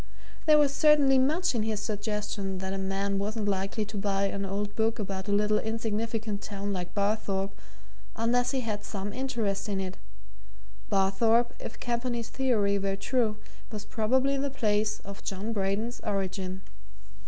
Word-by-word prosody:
There 305 -1 +8
was 290 -2 +4
certainly 285 -3 +6
much 315 +7 +2
in 230 - +1
his 215 -1 -1
suggestion 210 -2 -2
that 190 +1 -3
a 195 - -2
man 195 +1 0
wasn't 210 +1 -1
likely 195 +2 0
to 210 0 -6
buy 200 -1 +1
an 200 0 -1
old 205 +1 -2
book 225 +1 +1
about 195 -2 -4
a - - 0
little 210 +1 +3
insignificant 220 -1 -2
town 200 -1 -3
like 180 0 -4
Barthorpe 200 -1 0 0.6
unless 240 +2 +2
he 265 -2 0
had 210 -3 -3
some 200 -1 -4
interest 230 -6 -1
in 195 -1 0
it 190 -1 -4 0.9
Barthorpe, 225 +5 +3
if - - -7
Campany's 235 -1 -2
theory 210 -7 +2
were 195 0 0
true, 220 +1 +1 0.3
was 210 -2 -5
probably 260 +6 +2
the 280 +1 0
place 215 -4 +1
of 200 0 -9
John 200 +4 -3
Braden's 210 +4 -1
origin. 190 -2 -2
210 Hz, 155 wpm, -29 LUFS, 195-230 Hz, 0.9 s, There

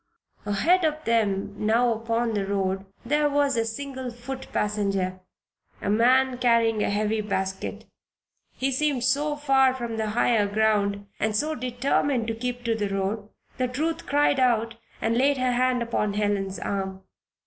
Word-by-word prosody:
Ahead 330 - +3
of 310 -1 0
them 205 -4 +1
now 230 +2 +3
upon 230 +1 -1
the 205 -2 0
road 195 -1 -1 0.2
there 295 0 +2
was 285 -1 +2
a 230 - +2
single 260 +2 -5
foot 245 +3 -7
passenger 195 -3 -1 0.6
a 200 - -1
man 250 +3 +3
carrying 230 -3 +3
a - - +1
heavy 210 +1 0
basket. 190 -2 -3 0.7
He 270 +1 -1
seemed 270 -2 0
so 290 +4 +1
far 270 -3 +3
from 235 -3 -4
the 220 -1 -1
higher 225 -4 +3
ground, 205 -1 +1
and 215 -1 0
so 305 +8 0
determined 255 -1 0
to - - 0
keep 245 +2 -4
to 230 -1 +1
the 210 -2 -2
road, 200 +2 -2 0.3
that 255 0 -2
Ruth 325 +2 -2
cried 285 -1 +3
out 230 -3 +2 0.3
and 225 +1 +1
laid 280 +1 +3
her 255 -1 +1
hand 250 0 +1
upon 210 -3 -1
Helen's 200 -2 -1
arm. 190 -1 -4
230 Hz, 160 wpm, -25 LUFS, 205-260 Hz, 0.7 s, Ahead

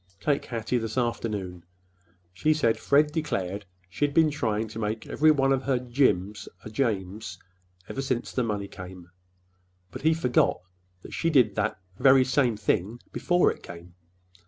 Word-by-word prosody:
Take 145 +5 0
Hattie 115 +1 -2
this 110 0 -5
afternoon. 105 -7 -2 0.7
She 155 +11 +2
said 115 -7 +3
that - - -14
Fred 150 +1 +3
declared 100 - -2 0.2
she'd 140 +10 -1
been 160 -2 +5
trying 110 -6 -1
to 110 - -7
make 110 +1 -3
every 155 +1 +3
one 135 -3 +4
of 135 - 0
her 130 -1 +1
'Jims' 120 -6 0 0.2
a 110 - -7
'James,' 105 -3 -2 0.5
ever 135 - -4
since 130 -3 -2
the 125 - -1
money 105 -4 -2
came. 90 -2 -11 0.8
But - - -8
he 160 +1 +3
forgot 125 - +2 0.4
that - - -10
she 165 - 0
did 135 -7 +4
that - - -1 0.2
very 130 0 +6
same 125 -4 +2
thing 105 +2 -1
before 175 0 +2
it - - -10
came. 85 0 -11
120 Hz, 160 wpm, -27 LUFS, 105-135 Hz, 0.8 s, very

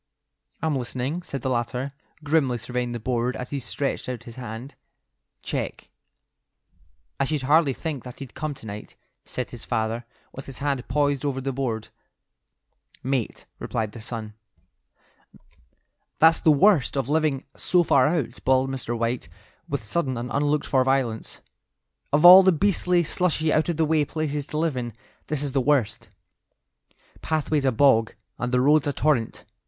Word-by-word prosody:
"I'm 160 -2 +1
listening," 130 +6 -3
said 140 -7 -6
the 130 - 0
latter, 125 +3 -2 0.3
grimly 145 -5 +2
surveying 125 +1 -3
the 120 - -4
board 125 +2 -1
as 125 - -6
he 140 - -2
stretched 135 +2 -3
out 120 -2 -5
his 115 -1 -11
hand. 120 +2 -7 0.7
"Check." - - -4 1.3
"I 140 - +2
should 150 -1 -2
hardly 145 +1 +4
think 150 -3 -5
that 125 -1 -10
he'd 135 -3 -9
come 155 -2 -4
to 115 - -12
night," 105 0 -8 0.3
said - - -4
his - - -8
father, 115 +1 -1 0.3
with 135 - -9
his 135 - -8
hand 140 -3 -2
poised 145 -2 +1
over 140 -2 -1
the 135 0 -3
board. 120 -5 -3 1.1
"Mate," 130 -3 -2
replied 110 -2 -2
the 115 - -10
son. 110 -1 -6 1.8
"That's 160 +1 +5
the - - +3
worst 155 - +4
of 135 -3 0
living 150 -2 +1
so 180 -1 +2
far 135 -4 +4
out," 150 -8 -1
bawled 130 0 +2
Mr. 120 -3 -3
White, 115 +1 -2 0.4
with - - -2
sudden 130 +2 -1
and 120 +1 -5
unlooked 145 +1 +1
for 130 -2 +2
violence; 130 -4 -1 0.7
"of 150 +4 +3
all 185 +2 +12
the 190 0 +5
beastly, 180 0 +2
slushy, 160 -2 +1
out 155 +2 +2
of 170 - -1
the 160 - +3
way 155 -1 +2
places 150 -2 -3
to 150 - -4
live 160 -2 0
in, 120 -2 -4 0.3
this 150 -1 -2
is 140 - -2
the 135 0 +1
worst. 120 -5 0 1.1
Pathway's 155 -2 0
a 130 - +4
bog, 115 -3 +3 0.2
and 125 0 -2
the 125 0 +3
road's 150 +2 +4
a 145 - 0
torrent. 135 -6 0
135 Hz, 165 wpm, -25 LUFS, 120-150 Hz, 1.8 s, all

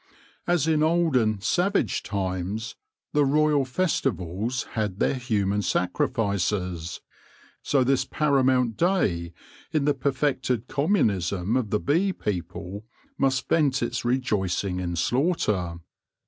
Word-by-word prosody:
As 175 -4 +2
in 155 -1 +2
olden, 150 - +2
savage 180 - +1
times, 100 +4 -3 0.4
the 150 -1 +4
royal 150 0 +3
festivals 125 - -1
had 105 -4 -2
their - - +2
human 105 -6 0
sacrifices, 90 -2 -1 0.6
so 135 -3 +2
this 135 +1 +2
paramount 130 -6 +2
day 95 - +1 0.4
in 150 -3 +1
the 145 - +3
per 140 +1 0
fected 130 -3 -1
communism 105 - +1
of 125 -5 0
the 105 - +1
bee 175 - +1
people 90 - -5 0.4
must 135 -1 +1
vent 140 -6 +2
its 120 - -2
rejoicing 100 -7 0
in 85 -1 -3
slaughter. 100 - 0
120 Hz, 115 wpm, -25 LUFS, 95-140 Hz, 0.6 s, the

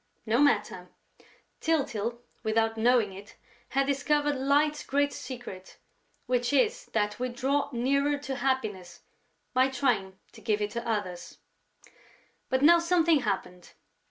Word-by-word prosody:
No 230 +2 +2
matter! 210 -10 +1 0.7
Tyltyl, 240 -7 -1 0.2
without 225 +1 +1
knowing 225 -3 +2
it, 200 +2 -12 0.3
had 275 +1 +1
discovered 290 +1 +1
Light's 290 +3 +1
great 285 +1 0
secret, 240 -8 -8 0.5
which 245 0 0
is 425 - +2
that 210 0 0
we 255 0 -1
draw 270 +4 0
nearer 280 +4 +1
to 275 -2 -5
happiness 215 -10 -2 0.5
by 260 +1 +4
trying 235 -8 0
to - - -15
give 215 -2 0
it 210 0 -2
to 235 +1 -5
others. 185 -5 -4 1.1
But 260 +1 +1
now 340 +3 +7
something 335 -2 +3
happened. 180 -6 -4
250 Hz, 130 wpm, -28 LUFS, 215-280 Hz, 1.1 s, now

